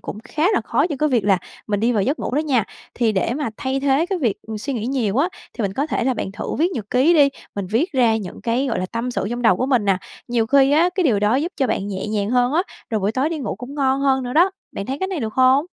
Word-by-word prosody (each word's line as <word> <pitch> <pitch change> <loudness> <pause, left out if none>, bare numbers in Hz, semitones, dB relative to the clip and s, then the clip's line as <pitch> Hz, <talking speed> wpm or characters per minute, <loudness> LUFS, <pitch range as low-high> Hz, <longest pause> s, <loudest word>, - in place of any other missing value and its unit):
cũng 205 - -7
khá 300 +4 -2
là - - +2
khó - - +1
cho 295 -5 -4
cái 305 - +2
việc 240 -7 +1
là 195 -2 +4 0.3
mình 205 -2 -1
đi 235 +3 +2
vào 210 -4 +1
giấc 280 +10 0
ngủ 250 - -3
đó - - +2
nha. 270 -8 +1 0.3
Thì 230 -3 +1
để 205 +5 0
mà 290 -3 -2
thay 270 0 -2
thế 280 +4 +2
cái 380 0 -2
việc, 235 - 0
ừm, 220 -1 -6
suy 275 +6 -4
nghĩ 230 -2 -3
nhiều 240 -6 0
á, 295 +6 +3 0.3
thì 235 - -3
mình 195 -1 -1
có 280 +8 -1
thể 295 - -1
là 260 0 +1
bạn 195 - -4
thử 200 - -4
viết 350 +4 +2
nhật 215 -8 -5
ký 270 +7 +4
đi, 290 -3 +6 0.3
mình 200 -2 -3
viết 235 - 0
ra 240 -5 +3
những 200 -5 -7
cái, 240 +5 0
gọi 240 - -1
là, 185 - -2
tâm 230 +5 -3
sự 220 - -2
trong 240 0 -3
đầu 185 -6 +5
của 255 - -1
mình 250 -6 +2
nè, 195 -2 +3 0.3
nhiều 235 -2 +1
khi 275 +1 +4
á 335 +4 +4
cái 375 - +1
điều 235 -9 +3
đó 210 +3 +2
giúp 330 +6 -1
cho 265 - +1
bạn 200 - -1
nhẹ 190 0 -4
nhàng 210 -1 -1
hơn 245 +1 +2
á, 340 +4 +3 0.3
rồi 220 -2 0
buổi 200 +3 0
tối 265 +5 +1
đi 325 -1 -3
ngủ 250 -8 -3
cũng 255 +3 -8
ngon 270 -1 +1
hơn 265 -1 +2
nữa 245 - -4
đó, 345 +6 +5 0.2
bạn 200 - -5
thấy 270 +2 -3
cái 380 - -1
này 360 -7 -3
được 220 -1 -3
hông? 260 +4 +4
250 Hz, 310 wpm, -21 LUFS, 220-280 Hz, 0.3 s, đi